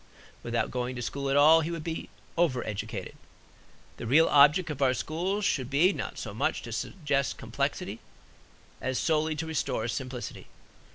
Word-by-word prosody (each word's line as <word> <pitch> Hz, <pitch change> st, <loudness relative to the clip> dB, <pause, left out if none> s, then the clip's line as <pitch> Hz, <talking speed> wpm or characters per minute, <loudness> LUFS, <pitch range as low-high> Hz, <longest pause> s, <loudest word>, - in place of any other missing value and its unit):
Without 115 Hz, 0 st, -1 dB
going 125 Hz, 0 st, -2 dB
to 125 Hz, -, -5 dB
school 140 Hz, +3 st, -3 dB
at 135 Hz, -, +3 dB
all, 155 Hz, +3 st, +7 dB
he 160 Hz, -, -3 dB
would 165 Hz, -2 st, -4 dB
be 165 Hz, 0 st, -4 dB, 0.3 s
over 160 Hz, -8 st, +1 dB
educated. 105 Hz, -2 st, -5 dB, 0.8 s
The -, -, -6 dB
real 155 Hz, +7 st, +5 dB
object 150 Hz, +4 st, +5 dB
of 145 Hz, -2 st, -6 dB
our 130 Hz, -2 st, +4 dB
schools 185 Hz, +9 st, -2 dB
should 130 Hz, -10 st, 0 dB
be 160 Hz, +8 st, +4 dB
not -, -, -5 dB
so -, -, -5 dB
much -, -, -1 dB
to -, -, -7 dB
suggest 145 Hz, -6 st, -1 dB
complexity -, -, -3 dB, 0.8 s
as 130 Hz, -1 st, -1 dB
solely 155 Hz, -1 st, +1 dB
to 155 Hz, +2 st, -3 dB
restore 160 Hz, -6 st, -1 dB
simplicity. 125 Hz, 0 st, -5 dB
145 Hz, 165 wpm, -28 LUFS, 130-160 Hz, 0.8 s, all